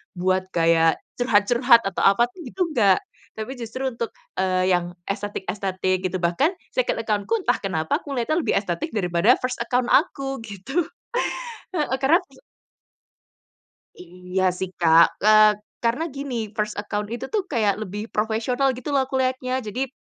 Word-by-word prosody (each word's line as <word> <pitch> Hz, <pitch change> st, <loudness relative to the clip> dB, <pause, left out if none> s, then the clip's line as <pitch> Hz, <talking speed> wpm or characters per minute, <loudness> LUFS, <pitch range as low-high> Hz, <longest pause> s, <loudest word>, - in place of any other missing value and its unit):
buat 185 Hz, +1 st, 0 dB
gaya 165 Hz, -1 st, +4 dB, 0.2 s
curhat-curhat 235 Hz, +1 st, +4 dB
atau 195 Hz, -, -2 dB
apa, 200 Hz, +4 st, +4 dB, 0.2 s
itu 260 Hz, -8 st, -8 dB
gitu 385 Hz, -, -4 dB
nggak. 200 Hz, -8 st, +4 dB, 0.3 s
Tapi 220 Hz, +5 st, -6 dB
justru 245 Hz, +3 st, -4 dB
untuk, 235 Hz, -2 st, -4 dB, 0.2 s
eee, 185 Hz, 0 st, +1 dB
yang, 175 Hz, 0 st, -2 dB, 0.2 s
estetik-estetik 190 Hz, -2 st, -2 dB
gitu. 185 Hz, 0 st, -1 dB
Bahkan 175 Hz, -, +2 dB, 0.2 s
second -, -, +1 dB
account-ku 215 Hz, -, -1 dB
entah 375 Hz, -, +1 dB
kenapa 160 Hz, -5 st, -1 dB
aku 285 Hz, -, -8 dB
ngelihatnya 275 Hz, +5 st, 0 dB
lebih -, -, +1 dB
estetik 175 Hz, -4 st, -4 dB
daripada 195 Hz, +3 st, +2 dB
first 250 Hz, 0 st, -2 dB
account 245 Hz, 0 st, 0 dB
aku, 275 Hz, -3 st, +1 dB
gitu. 225 Hz, -, -2 dB, 0.9 s
Heeh, 295 Hz, -5 st, 0 dB
karena 290 Hz, +6 st, +4 dB, 1.8 s
Iya 180 Hz, +1 st, -4 dB
sih 185 Hz, 0 st, -4 dB
Kak, 165 Hz, -1 st, +5 dB
eee, 215 Hz, 0 st, +7 dB, 0.3 s
karena 235 Hz, +7 st, +1 dB
gini, 245 Hz, -7 st, -4 dB
first 210 Hz, -1 st, -2 dB
account 205 Hz, 0 st, -3 dB
itu 240 Hz, +2 st, -4 dB
tuh, 420 Hz, -3 st, +1 dB
kayak 215 Hz, -7 st, +1 dB
lebih 210 Hz, +1 st, -5 dB
profesional 225 Hz, +5 st, +1 dB
gitu 255 Hz, +4 st, -5 dB
lah 265 Hz, -2 st, +2 dB
aku 265 Hz, -, -3 dB
liatnya. 255 Hz, 0 st, -1 dB
Jadi, 255 Hz, +6 st, -2 dB
215 Hz, 145 wpm, -23 LUFS, 185-255 Hz, 1.8 s, eee